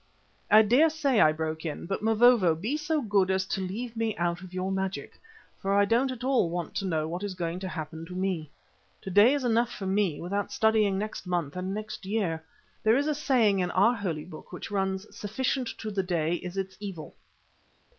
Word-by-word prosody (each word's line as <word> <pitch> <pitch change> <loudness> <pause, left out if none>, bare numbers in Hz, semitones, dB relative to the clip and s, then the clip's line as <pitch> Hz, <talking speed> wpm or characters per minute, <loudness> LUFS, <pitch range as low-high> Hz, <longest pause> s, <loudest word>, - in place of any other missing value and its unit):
"I 215 +1 +8
daresay," 280 +2 +3
I 155 - +6
broke 160 0 -3
in, 155 -3 -4
"but, 195 +3 -3
Mavovo, 225 -5 +5
be 215 - -2
so 305 0 -1
good 200 -3 +2
as 190 0 +1
to 190 - -2
leave 220 +6 -4
me 225 -1 -1
out 175 0 -1
of 185 -1 -10
your 185 +1 -2
magic, 190 0 -3 0.4
for 195 +1 0
I 200 0 +5
don't 235 +5 +2
at 250 -1 -7
all 255 -9 +2
want 175 -1 -4
to 195 - -2
know 155 -3 0
what 175 +3 -4
is 205 -2 -4
going 170 0 -3
to 190 - -5
happen 160 -1 -6
to 180 - -8
me. 185 -5 -2 0.5
To 190 - -5
day 210 +9 +6
is 285 - -2
enough 235 0 +2
for 195 - -6
me 190 -5 +1
without 200 +4 -3
studying 215 -3 +2
next 210 -1 -5
month 175 -5 -1
and 185 +1 -3
next 215 +1 -5
year. 185 -7 -1 0.4
There 220 +2 +4
is 285 - +1
a 305 - +1
saying 250 -9 +2
in 180 -1 0
our 200 +7 +4
holy 175 -9 -3
book 160 -3 -12
which 180 - -7
runs: 190 0 -1
'Sufficient 250 +4 -2
to 215 - -5
the 200 -1 0
day 170 -3 0
is 180 +2 -7
its 190 -1 -4
evil. 195 -7 -7
195 Hz, 210 wpm, -28 LUFS, 180-225 Hz, 0.5 s, I